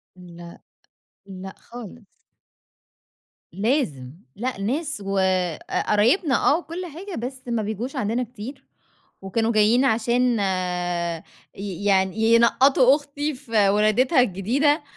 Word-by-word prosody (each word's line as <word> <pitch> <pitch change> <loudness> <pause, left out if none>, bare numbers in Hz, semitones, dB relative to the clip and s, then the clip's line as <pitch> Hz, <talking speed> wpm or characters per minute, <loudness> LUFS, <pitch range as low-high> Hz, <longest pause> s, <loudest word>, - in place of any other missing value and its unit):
لأ. 175 -1 -12 0.6
لأ 190 0 -9
خالص. 235 -1 -11 1.5
لازم. 195 - -1 0.2
لأ 250 +1 -3
ناس 275 +3 -2
وق 195 -1 0 0.7
قرايبنا 255 - +3
آه 300 - +3
و 350 - -7
كل 355 +3 -6
حاجة 350 +4 -8
بس 260 0 -7
ما 235 -2 -1
بيجوش 220 +7 -4
عندنا 245 0 -1
كتير، 250 +4 -9 0.6
وكانوا 225 +4 -1
جايين 225 +5 +4
عشان 235 0 +2 1.2
ي 200 0 -6
يعني 190 0 +2 0.2
ينقّطوا 255 +3 +5
أختي 290 +1 -4
في 225 -6 +1
ولادتها 215 +6 +3
الجديدة 255 - +1
235 Hz, 110 wpm, -23 LUFS, 200-270 Hz, 1.5 s, ينقّطوا